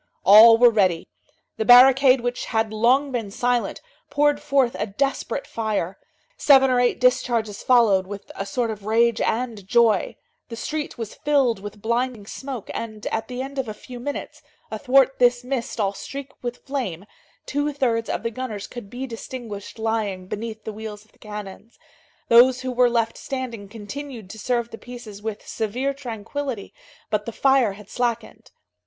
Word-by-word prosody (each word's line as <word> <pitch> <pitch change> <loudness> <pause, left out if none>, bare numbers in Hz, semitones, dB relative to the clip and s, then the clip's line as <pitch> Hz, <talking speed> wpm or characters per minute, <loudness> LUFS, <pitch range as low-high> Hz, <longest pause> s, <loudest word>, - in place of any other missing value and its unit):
All 220 +4 +9
were 240 0 +7
ready. 185 -6 +1 0.5
The - - 0
barricade, 255 +2 +7
which 245 +1 -3
had 220 -2 -1
long 255 +6 +3
been 230 -5 -3
silent, 245 +3 -1 0.3
poured 290 0 +2
forth 275 -4 +1
a - - -1
desperate 275 +5 -2
fire; 210 -5 -3 0.4
seven 270 - +5
or 250 - +3
eight 245 0 +2
discharges 240 -4 +1
followed, 215 -7 +4
with 200 0 -8
a 195 - -5
sort 230 +3 -1
of 210 -1 -8
rage 230 +1 +3
and 225 -4 -2
joy; 235 - +3 0.3
the 230 - -6
street 300 +5 -4
was 225 -3 -6
filled 275 -7 +1
with 205 +1 -10
blinding 235 -1 -1
smoke, 260 0 -7
and, 215 -2 -6
at 220 0 -2
the 255 0 -4
end 275 +1 -6
of 260 - -2
a 215 - -6
few 250 +2 -10
minutes, 285 +4 -6 0.3
athwart 265 +4 +3
this 245 0 +3
mist 250 -3 -4
all 200 -2 +1
streaked 275 +6 -8
with 240 0 -6
flame, 205 - -4 0.4
two 290 +2 -1
thirds 235 -5 -1
of - - -2
the 230 - -2
gunners 220 -4 -5
could 240 -5 -9
be 250 +4 -5
distinguished 230 -4 -8
lying 220 -4 -2
beneath 220 +2 -6
the 220 - -6
wheels 215 -1 -8
of 220 - -30
the - - -30
cannons. 210 +1 -9 0.5
Those 250 +2 +6
who 255 0 -3
were 250 0 +4
left 230 -1 0
standing 235 -7 -5
continued 225 0 -8
to 220 - -10
serve 235 +1 -1
the 225 - -9
pieces 240 -5 -10
with 215 -1 -6
severe 245 +5 -2
tranquillity, 250 -1 -6 0.4
but 210 0 -1
the - - -3
fire 265 -3 +3
had 205 0 -13
slackened. 235 -2 -3
235 Hz, 170 wpm, -23 LUFS, 215-255 Hz, 0.5 s, All